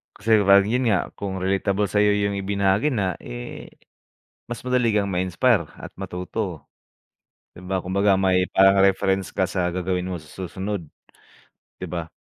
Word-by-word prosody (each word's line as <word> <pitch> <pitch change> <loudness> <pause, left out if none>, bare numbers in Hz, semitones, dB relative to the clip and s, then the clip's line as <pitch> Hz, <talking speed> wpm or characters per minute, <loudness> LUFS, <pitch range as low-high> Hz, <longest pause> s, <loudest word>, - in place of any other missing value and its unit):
Kasi 110 - -7 0.2
pag 100 0 +7
yun 120 +4 0
nga, 95 -5 +1
kung 95 -2 -4
relatable 100 +1 0
sayo 105 0 +3
yung 100 -1 0
ibinahagi 100 +6 +1
na 95 -7 -1
eh, - - -8 0.8
mas 120 - -4
madali 125 -2 +2
kang 105 -1 +1
ma-inspire 95 +4 +2 0.2
at - - -9
matuto. 90 -1 -5 0.9
Di - - -12
ba, 95 0 -2
kumbaga 100 +2 +2
may 95 -1 +2
parang 95 0 +5
reference 95 0 +1
ka 95 - +1
sa 90 -1 -1
gagawin 90 0 -2
mo 90 - -3
sa 75 -1 -15
susunod. 95 +1 -5 1.0
Di - - -6
ba? 85 -2 -4
95 Hz, 150 wpm, -23 LUFS, 90-100 Hz, 1.0 s, pag